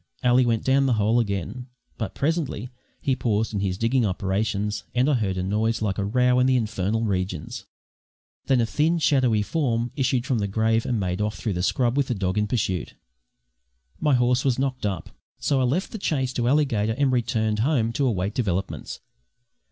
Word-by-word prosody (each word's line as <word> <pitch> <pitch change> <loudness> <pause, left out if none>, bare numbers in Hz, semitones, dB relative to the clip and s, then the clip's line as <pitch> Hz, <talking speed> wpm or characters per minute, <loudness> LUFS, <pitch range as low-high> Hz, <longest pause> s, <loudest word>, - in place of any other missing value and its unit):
Ally 125 +1 +5
went 115 -2 0
down 135 +1 +3
the 130 - +3
hole 110 +3 +3
again, 105 +3 -3 0.3
but 110 - -4
presently 140 -6 -2 0.3
he 135 - +1
paused 110 -3 -1
in 100 - -1
his 95 -2 -1
digging 120 +4 +1
operations, 105 +2 -1
and 125 +2 +3
I 150 - +3
heard 100 -7 0
a 90 - -1
noise 110 +4 0
like 105 -2 -1
a - - 0
row 125 +4 +2
in 125 - +4
the 130 - +3
infernal 110 -1 0
regions. 90 -6 -3 0.8
Then 130 -2 +3
a - - +2
thin 155 +9 +1
shadowy 130 -9 +2
form 120 -4 -1
issued 130 -3 0
from 130 -5 0
the 100 - -1
grave 110 +3 +1
and 120 -3 0
made 90 0 -2
off 105 0 -1
through 105 - -2
the 90 - -2
scrub 120 +7 +1
with 140 -2 +2
the 120 - -1
dog 95 0 -1
in 105 - 0
pursuit. 95 -6 -2 1.0
My 150 -4 +3
horse 125 +1 +2
was 130 -3 +1
knocked 130 -4 -1
up, 95 -2 -5 0.3
so 135 -2 +1
I - - +2
left 160 +10 -1
the 220 - -6
chase 135 -8 -1
to 120 -1 0
Alligator 120 -6 +2
and 140 -2 +2
returned 110 -3 0
home 115 -3 +1
to 135 +2 +1
await 100 -3 -1
developments. 95 -5 -3
115 Hz, 195 wpm, -24 LUFS, 105-130 Hz, 1.0 s, Ally